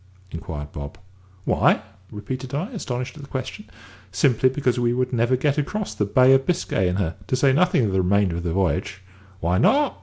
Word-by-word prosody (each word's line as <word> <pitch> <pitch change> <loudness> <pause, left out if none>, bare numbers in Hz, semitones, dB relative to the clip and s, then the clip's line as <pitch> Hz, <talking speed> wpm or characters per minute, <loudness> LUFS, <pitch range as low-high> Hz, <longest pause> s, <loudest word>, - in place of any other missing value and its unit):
inquired 80 -4 -6
Bob. 70 +4 -8 0.5
"Why?" - - +3 0.3
repeated 125 +5 -6
I, 180 - -3
astonished 125 - -5
at - - -9
the 140 - -12
question. 130 - -6 0.4
"Simply 120 +6 +3
because 130 -2 0
we 120 0 +1
should 125 0 -1
never 120 +2 +2
get 145 +3 0
across 210 +8 -3
the 105 - -1
Bay 130 +6 +5
of 135 0 +2
Biscay 170 - 0
in 90 - -1
her, 90 -4 -1
to - - 0
say 135 +1 +3
nothing 165 -5 +3
of 100 - -1
the 95 0 +2
remainder 95 -1 +1
of 85 - -5
the 85 - -2
voyage." 95 +1 -1 0.4
"Why 90 +3 +1
not?" 290 -1 +2
125 Hz, 200 wpm, -23 LUFS, 95-135 Hz, 0.5 s, Bay